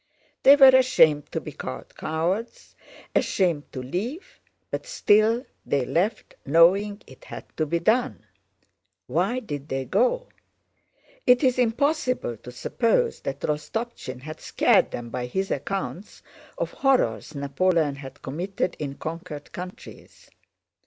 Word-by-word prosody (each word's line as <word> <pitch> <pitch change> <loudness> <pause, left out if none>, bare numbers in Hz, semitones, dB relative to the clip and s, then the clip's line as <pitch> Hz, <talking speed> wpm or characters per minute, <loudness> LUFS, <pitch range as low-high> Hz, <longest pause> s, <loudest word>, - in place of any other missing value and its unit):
They 275 - +9
were 270 -2 +9
ashamed 160 - +4
to - - -1
be - - -8
called - - -8
cowards, 175 +9 -3 0.4
ashamed 170 -6 +1
to 130 - -6
leave, 220 - -5 0.3
but - - -4
still 225 - +3 0.2
they 135 -3 0
left, 190 - -1
knowing 195 +7 +4
it 130 - -16
had - - -8
to 155 - 0
be 170 - +1
done. 225 - +1 0.8
Why 180 - 0
did 145 - -6
they 135 0 -2
go? - - +1 1.0
It 250 +3 +5
is 255 -1 +3
impossible 255 - 0
to 125 - -11
suppose 240 - 0
that 140 0 -5
Rostopchín 150 - -4
had 155 +3 -9
scared - - +3
them 120 -1 -6
by 125 -1 -3
his 190 +9 -2
accounts 190 +6 -4 0.3
of - - -2
horrors 245 - +1
Napoleon 145 +1 +1
had 135 0 -11
committed 175 +6 -3
in 140 -2 -4
conquered 155 -2 -7
countries. 180 +1 -10
175 Hz, 130 wpm, -25 LUFS, 145-235 Hz, 1.0 s, They